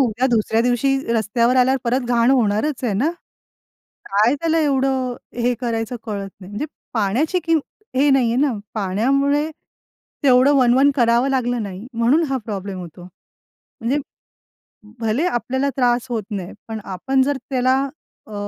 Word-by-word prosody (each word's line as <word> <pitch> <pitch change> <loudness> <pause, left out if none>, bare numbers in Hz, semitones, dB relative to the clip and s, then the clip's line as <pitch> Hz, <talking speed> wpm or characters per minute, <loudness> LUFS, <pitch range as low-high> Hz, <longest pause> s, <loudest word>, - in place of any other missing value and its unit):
उद्या 245 0 +1
दुसऱ्या 225 -2 +1
दिवशी 250 +3 +2 0.2
रस्त्यावर 235 +3 +2
आल्यावर 260 +1 +4
परत 245 +1 0
घाण 240 +1 +3
होणारच 250 +3 +1
आहे 220 - 0
ना? 265 +12 +1 0.9
काय 215 +7 +2
त्याला 330 0 +1
एवढं 265 -3 +1 0.3
हे 245 0 +2
करायचं 230 0 -2
कळत 200 -3 -4
नाही. 185 - -11
म्हणजे 230 +9 -3 0.3
पाण्याची 240 - +1
किमत 325 -3 +2 0.3
हे 285 +2 +4
नाहीये 245 -3 +3
ना 275 -1 +2 0.2
पाण्यामुळे 275 +10 +1 0.7
तेवढं 260 +2 +5
वणवण 260 +2 +5
करावं 240 0 +3
लागलं 245 -3 0
नाही 200 +3 -7
म्हणून 240 +8 +3
हा 270 - 0
प्रॉब्लेम 200 -3 -5
होतो. 175 0 -10
म्हणजे 230 +7 -7 1.0
भले 225 +8 0
आपल्याला 260 -2 -1
त्रास 245 0 +2
होत 225 -4 -2
नाही, 190 -3 -4 0.2
पण 220 -1 -5
आपण 265 +9 0
जर 285 0 0
त्याला 255 0 +2 0.5
अ, 215 - -11
245 Hz, 145 wpm, -20 LUFS, 220-270 Hz, 1.0 s, तेवढं